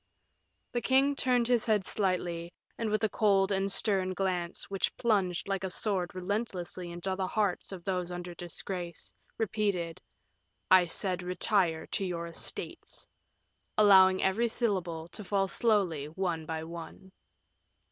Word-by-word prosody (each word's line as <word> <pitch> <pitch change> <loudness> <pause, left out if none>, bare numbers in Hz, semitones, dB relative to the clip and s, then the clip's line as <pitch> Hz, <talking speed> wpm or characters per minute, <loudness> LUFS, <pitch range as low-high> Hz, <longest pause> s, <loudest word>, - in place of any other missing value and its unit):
The 240 - -1
king 270 +3 +3
turned 250 -3 +2
his 240 -3 +3
head 210 -3 +2
slightly, 175 -4 -1 0.2
and 225 -2 -2
with 215 0 0
a 220 - +3
cold 195 -2 +3
and 195 0 +1
stern 190 -3 +3
glance, 180 -2 -2
which 195 -1 -1
plunged 195 -8 +1
like 195 -1 -1
a 190 - -1
sword 185 -2 -1
relentlessly 185 -2 -3
into 175 +2 -3
the 190 -1 -1
hearts 200 -2 -1
of 185 -3 -7
those 180 -2 -1
under 175 0 -6
disgrace, 175 0 -5 0.2
repeated, 200 -6 -1 0.7
"I 185 -1 +7
said 180 +1 -1
retire 180 -2 +1
to - - -2
your 175 -2 -3
estates," 170 - -6 0.7
allowing 190 -3 +7
every 210 +5 +2
syllable 185 -9 -2
to 210 - -8
fall 195 0 +1
slowly 190 - +1
one 165 -1 -3
by 160 -1 -3
one. 170 +3 -9
190 Hz, 140 wpm, -30 LUFS, 175-205 Hz, 0.7 s, I